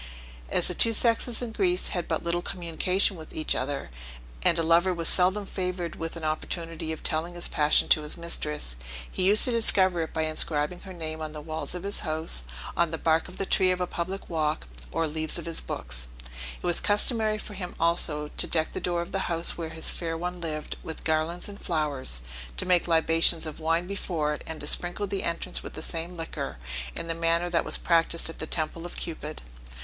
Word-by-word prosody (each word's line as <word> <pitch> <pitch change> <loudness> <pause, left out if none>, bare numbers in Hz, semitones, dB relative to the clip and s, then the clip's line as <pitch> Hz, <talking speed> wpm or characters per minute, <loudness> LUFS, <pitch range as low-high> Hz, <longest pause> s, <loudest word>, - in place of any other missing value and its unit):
As - - +4
the - - +2
two 230 - +7
sexes 230 +1 +1
in 235 - -4
Greece 185 -4 +1
had 175 -2 -2
but 160 - -1
little 170 +1 0
communication 180 +2 +1
with 160 - -11
each 155 - +1
other, 135 - -3 0.5
and 170 - +4
a 165 - +1
lover 170 +3 +4
was 165 -1 -1
seldom 190 +3 +4
favored 180 -3 -3
with 165 +1 -5
an 165 - -7
opportunity 160 +1 -3
of 160 - -6
telling 165 +3 0
his 175 - 0
passion 150 0 +3
to 155 - +5
his 150 0 -1
mistress, 150 - -1 0.3
he - - -2
used 205 +3 +9
to 250 - +2
discover 190 -6 +3
it 160 - -3
by 160 - -1
inscribing 155 +1 +1
her 190 - -10
name 160 -2 -4
on 155 -1 -5
the 155 - -6
walls 160 +3 -3
of 180 - -5
his 200 +1 -1
house, 155 - 0 0.3
on 170 -1 +3
the 165 - -3
bark 160 +1 +2
of 180 - -10
the 195 - -2
trees 185 -1 +4
of 180 - -4
a 180 - +1
public 185 +3 -4
walk, 155 - -1 0.3
or 165 - 0
leaves 155 +1 +3
of 170 - -4
his 165 -1 0
books; 60 0 -5 0.5
it - - -10
was 175 -1 +3
customary 215 +1 +2
for 215 - -8
him 185 -2 -6
also 160 -3 +1
to - - +2
deck 160 -1 0
the - - -4
door 175 -1 0
of - - -11
the 190 -1 -2
house 170 0 0
where 165 -2 -5
his 160 0 -1
fair 165 -1 -3
one 180 +1 -4
lived, 155 -2 -4
with 160 - -7
garlands 160 +2 0
and 205 0 -9
flowers, 145 - -2 0.3
to - - +2
make 180 -1 +3
libations 165 0 +4
of 155 0 -7
wine 165 +2 +1
before 170 -6 -2
it, - - -7
and 160 -1 -6
to - - -6
sprinkle 175 +6 +2
the 195 0 -2
entrance 170 0 -2
with - - -8
the 155 - -6
same 170 +2 -4
liquor, 165 - -5 0.4
in - - -4
the 165 - -1
manner 165 +1 +1
that 170 - +2
was - - 0
practised 165 -1 +3
at - - -14
the 160 - -4
temple 160 +1 -2
of - - -11
Cupid. 155 -2 -5
165 Hz, 215 wpm, -27 LUFS, 160-180 Hz, 0.5 s, used